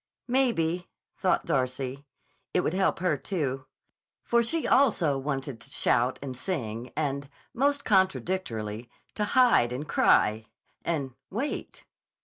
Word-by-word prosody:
Maybe, 185 -10 +1 0.3
thought - - +1
Darcy, 130 +2 -2 0.5
it 180 - +4
would 170 - -1
help 190 0 +2
her, 170 -4 +1
too; 135 -7 -3 0.6
for 235 0 +3
she 310 +8 0
also 215 - +4
wanted 135 -3 -4
to - - -11
shout 125 +2 +2
and 130 -2 -5
sing, 120 - -4
and, 140 -2 -2 0.2
most 285 +2 +1
contradictorily, 175 - 0 0.2
to 210 - -1
hide 240 - +4
and 135 +5 -4
cry—and 130 +6 0 0.2
wait. 250 +9 -4
150 Hz, 120 wpm, -28 LUFS, 130-195 Hz, 0.6 s, it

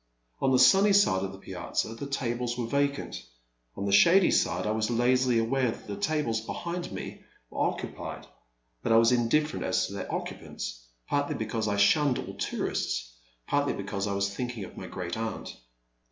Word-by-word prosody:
On 135 - +3
the 130 - +5
sunny 195 +11 +6
side 190 - +4
of 95 - -3
the 95 - -10
piazza 110 +3 -3
the 125 +5 -6
tables 125 -3 -2
were 120 - -1
vacant; 140 +3 -1 0.6
on 100 - -3
the 100 - 0
shady 170 - +6
side, 90 +2 +1
I 105 - +1
was 110 +1 0
lazily 125 +1 +3
aware 125 +3 +1
that - - -7
the - - -5
tables 150 - 0
behind 170 +9 -5
me - - -7 0.3
were - - -6
occu - - -7
pied, - - -7 0.6
but - - -1
I 115 - +7
was 115 +1 +5
indifierent 125 +6 +1
as 95 0 +1
to 95 - -7
their 100 - -5
occupants, - - -5 0.2
partly 145 0 0
because 110 0 -2
I 100 -1 0
shunned 130 +6 +4
all - - -5
tourists, - - -2 0.3
partly 145 0 +1
be 100 - -5
cause 100 +1 -3
I 100 - -1
was 100 0 +1
thinking 120 -1 -4
of - - -10
my - - -7
great 90 -1 -5
aunt. 110 0 -4
115 Hz, 190 wpm, -28 LUFS, 100-140 Hz, 0.6 s, I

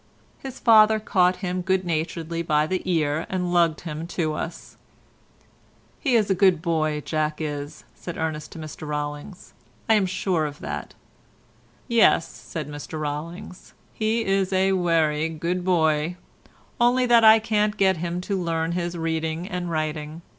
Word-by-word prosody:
His 265 -1 -8
father 220 -2 +6
caught 185 -4 +2
him 180 0 -2
good 190 0 0
naturedly 165 0 -2
by 150 -2 +2
the 185 +4 -2
ear 155 -1 0
and 180 -1 -2
lugged 170 -3 +2
him 160 -1 -6
to 160 -3 -2
us. 165 +2 -6 1.2
"He's 235 -8 +2
a - - +5
good 185 -2 +4
boy, 155 -2 0
Jack 155 0 -2
is," 150 -1 -5
said 175 - -8
Ernest 155 -1 -3
to - - -10
Mr 155 -1 -8
Rollings, 150 +4 -5 0.3
"I'm 210 -4 +4
sure 180 -4 0
of 145 0 -8
that." - - -6 0.9
"Yes," 230 -8 +4
said 155 -4 -7
Mr 150 +1 -7
Rollings, 165 +6 -6 0.2
"he's 215 -4 0
a 190 0 +2
werry 165 -4 +1
good 170 +3 -3
boy, 160 -2 +1 0.6
only 245 +1 +3
that 235 -2 +5
I 220 0 +9
can't 215 -1 0
get 190 -2 +3
him 175 +2 -3
to 190 0 -2
learn 165 -1 -1
his 175 0 -3
reading 160 +1 -2
and 180 -3 -4
writing. 155 0 -3
170 Hz, 145 wpm, -24 LUFS, 155-190 Hz, 1.2 s, I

